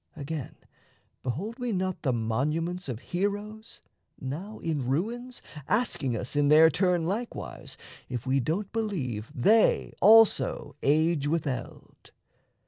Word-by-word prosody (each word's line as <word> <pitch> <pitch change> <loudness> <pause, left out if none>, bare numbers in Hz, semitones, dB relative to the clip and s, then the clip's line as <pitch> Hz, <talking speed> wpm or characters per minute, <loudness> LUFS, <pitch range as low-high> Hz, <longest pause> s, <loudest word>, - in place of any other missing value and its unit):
Again, 150 -2 -6 0.7
behold 190 - -4
we 245 -1 -2
not 185 -2 -2
the 135 - +1
monuments 150 +10 -1
Of 120 -1 -5
heroes, 205 +4 -3 0.4
now 165 +11 -6
in 150 -6 -2
ruins, 235 - -3 0.2
asking 185 - 0
us, 125 +5 -4
In 145 0 +3
their 160 +2 +7
turn 180 0 +1
likewise, 220 +7 -5 0.3
if 125 -1 -4
we 135 +1 +2
don't 175 - -2
believe 140 - -3
They 215 - +3
also 215 -12 +5
age 155 +1 +2
with 160 +1 0
eld? 125 -4 -7
165 Hz, 125 wpm, -28 LUFS, 135-205 Hz, 0.7 s, their